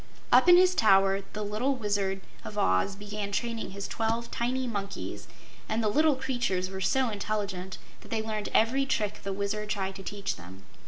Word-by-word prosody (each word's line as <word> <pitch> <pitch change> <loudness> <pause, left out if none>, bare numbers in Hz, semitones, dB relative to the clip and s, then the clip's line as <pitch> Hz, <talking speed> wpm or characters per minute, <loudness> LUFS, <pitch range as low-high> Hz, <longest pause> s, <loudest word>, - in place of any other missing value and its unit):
Up - - +6
in 350 - +10
his 365 0 +5
tower 195 - +4
the 210 - -3
little 220 +7 0
Wizard 200 -4 -1 0.2
of 210 - -8
Oz 95 - +2
began 205 0 -5
training 230 +3 -2
his 200 +1 -5
twelve 230 +1 -2
tiny 255 +2 -1
monkeys, 200 -4 -5 0.4
and 225 +1 0
the 215 - +2
little 305 +5 +4
creatures 245 -9 -1
were 190 0 -5
so 260 +5 +2
intelligent 200 -3 -3 0.2
that - - -15
they 220 -1 -1
learned 215 -1 -3
every 265 +5 +3
trick 210 -4 -1
the 195 - -4
Wizard 200 +2 -2
tried 195 -2 -1
to - - -8
teach 200 0 -4
them. 95 +3 -12
210 Hz, 180 wpm, -29 LUFS, 195-235 Hz, 0.4 s, in